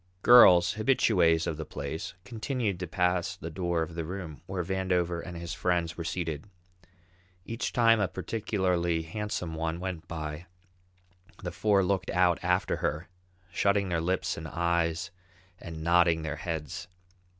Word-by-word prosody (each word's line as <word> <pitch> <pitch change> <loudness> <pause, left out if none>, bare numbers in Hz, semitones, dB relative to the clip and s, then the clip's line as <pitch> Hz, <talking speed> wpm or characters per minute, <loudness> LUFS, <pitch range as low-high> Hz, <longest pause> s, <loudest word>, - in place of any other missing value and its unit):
Girls, 100 -8 +8
habitués 90 -9 +3
of 80 - -2
the 80 - -4
place, 75 +3 -6
continued 115 -4 -2
to 90 - -4
pass 90 +1 0
the 80 - -7
door 85 -1 -1
of 80 - -7
the 85 0 -3
room 85 -3 -6
where 95 -1 -2
Vandover 90 -2 0
and 90 -2 -7
his 85 0 -5
friends 85 -2 0
were 85 - -5
seated. 80 0 -4 1.0
Each 115 +1 -3
time 115 -2 +4
a 100 - +2
particularly 90 -5 -1
handsome 90 -1 -4
one 80 +1 -2
went 90 -3 -5
by, 75 +1 -6 1.0
the - - -3
four 100 -3 +2
looked 95 0 0
out 90 -1 +3
after 90 +1 +1
her, 80 +4 -2 0.4
shutting 100 -1 +1
their 85 -2 0
lips 90 +3 -1
and 80 - -6
eyes 85 +2 0 0.5
and 80 -2 -7
nodding 85 -1 +4
their 80 - -3
heads. 80 0 -5
85 Hz, 150 wpm, -29 LUFS, 80-95 Hz, 1.0 s, Girls